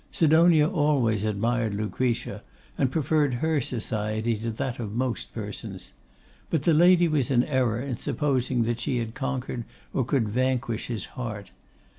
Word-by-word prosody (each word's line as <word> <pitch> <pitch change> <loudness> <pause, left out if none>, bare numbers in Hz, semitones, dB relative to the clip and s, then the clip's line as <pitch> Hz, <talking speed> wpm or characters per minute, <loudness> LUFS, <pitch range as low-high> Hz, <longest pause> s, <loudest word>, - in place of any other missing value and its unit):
Sidonia 160 -1 +5
always 145 - +1
admired 110 +1 0
Lucretia, 110 0 -2 0.3
and 135 -3 +1
preferred 150 -2 +1
her 155 +3 +1
society 110 -1 -2
to 115 +2 -3
that 120 +3 -3
of 105 -3 -4
most 120 -3 -2
persons. - - -7 0.6
But 160 -5 0
the 165 - +4
Lady 175 +2 +6
was 150 -5 +1
in 125 -3 +4
error 130 -6 +1
in 130 -4 -3
supposing 130 -4 0
that 115 0 -1
she 125 +1 -1
had 115 -1 -3
conquered 130 -3 -3 0.3
or 135 - +1
could 125 -2 +1
vanquish 125 0 -1
his 115 -3 -4
heart. 110 -6 -6
125 Hz, 150 wpm, -26 LUFS, 115-145 Hz, 0.6 s, Lady